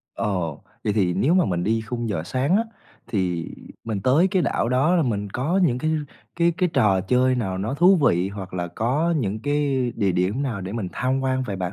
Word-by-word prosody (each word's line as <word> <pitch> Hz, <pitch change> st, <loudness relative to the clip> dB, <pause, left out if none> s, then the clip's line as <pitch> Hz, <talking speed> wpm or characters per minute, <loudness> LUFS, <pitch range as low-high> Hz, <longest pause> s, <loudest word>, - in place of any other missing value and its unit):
Ồ! 90 Hz, -7 st, -2 dB, 0.2 s
Vậy 105 Hz, -, +1 dB
thì 95 Hz, -4 st, +1 dB
nếu 160 Hz, +7 st, +2 dB
mà 185 Hz, -3 st, +4 dB
mình 85 Hz, -1 st, -1 dB
đi 115 Hz, +1 st, +1 dB
khung 115 Hz, +1 st, -4 dB
giờ 80 Hz, -7 st, -2 dB
sáng 135 Hz, -, +1 dB
á, 225 Hz, -, +1 dB, 0.4 s
thì 90 Hz, -5 st, -1 dB, 0.4 s
mình 110 Hz, -3 st, -3 dB
tới 145 Hz, -, +3 dB
cái 185 Hz, -2 st, +1 dB
đảo -, -, 0 dB
đó 135 Hz, +8 st, +2 dB
là 165 Hz, -, +3 dB
mình 105 Hz, -5 st, -2 dB
có 160 Hz, -, 0 dB
những 125 Hz, -7 st, +2 dB
cái 155 Hz, +4 st, -1 dB, 0.5 s
cái 170 Hz, 0 st, +3 dB
cái 180 Hz, -, +2 dB
trò 95 Hz, -3 st, +3 dB
chơi 125 Hz, +6 st, +2 dB
nào 95 Hz, -6 st, -2 dB
nó 110 Hz, +7 st, -2 dB
thú 180 Hz, +5 st, +5 dB
vị 95 Hz, -, +2 dB
hoặc 95 Hz, -2 st, -8 dB
là 90 Hz, -1 st, -2 dB
có 145 Hz, -, 0 dB
những 110 Hz, -5 st, -2 dB
cái 140 Hz, -4 st, 0 dB
địa 100 Hz, -4 st, +1 dB
điểm 95 Hz, +10 st, 0 dB
nào 115 Hz, -8 st, -3 dB
để 95 Hz, +2 st, -6 dB
mình 105 Hz, -6 st, -3 dB
tham 130 Hz, +1 st, 0 dB
quan 130 Hz, 0 st, 0 dB
vậy 100 Hz, -6 st, -4 dB
bạn? 90 Hz, 0 st, -3 dB
120 Hz, 225 wpm, -23 LUFS, 95-140 Hz, 0.5 s, thú